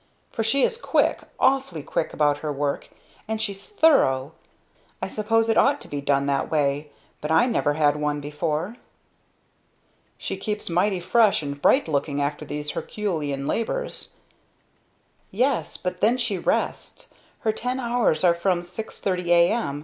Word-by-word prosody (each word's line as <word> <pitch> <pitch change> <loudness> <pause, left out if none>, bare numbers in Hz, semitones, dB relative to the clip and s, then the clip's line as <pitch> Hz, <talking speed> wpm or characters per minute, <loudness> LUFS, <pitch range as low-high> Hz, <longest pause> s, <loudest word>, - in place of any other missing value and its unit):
For 225 - -2
she 265 +5 +2
is 460 - +2
quick, - - +2 0.2
awfully 265 - +1
quick 155 - -2
about 145 -1 +2
her 150 -1 -3
work. 140 0 -2 0.4
And 220 0 -2
she's 200 -3 -4
thorough. 160 - +3 0.7
I - - -3
suppose 225 +1 +1
it 225 - +3
ought 285 +1 +3
to - - -9
be 145 -1 -4
done 140 0 +1
that 140 -1 0
way 145 -1 0 0.3
but 150 - -4
I 160 +7 +5
never 155 - +1
had 150 -1 +3
one 150 0 -1
before." 150 +8 -3 1.4
"She - - -4
keeps 210 -4 -3
mighty 185 +2 +2
fresh 200 0 +3
and 140 0 -5
bright 275 - +4
looking 145 -1 -1
after 145 +1 -2
these 150 0 -4
herculean 150 -10 -3
labors." - - -2 1.1
"Yes, 250 +5 0
but 180 0 -4
then 235 +4 +4
she 230 -5 0
rests! - - -2 0.3
Her 220 - +2
ten 250 +4 -3
hours 235 -10 +1
are 175 -2 +6
from 175 0 0
six 185 +6 -7
thirty 180 -3 -1
a.m. 170 -3 +3
175 Hz, 155 wpm, -24 LUFS, 145-225 Hz, 1.4 s, are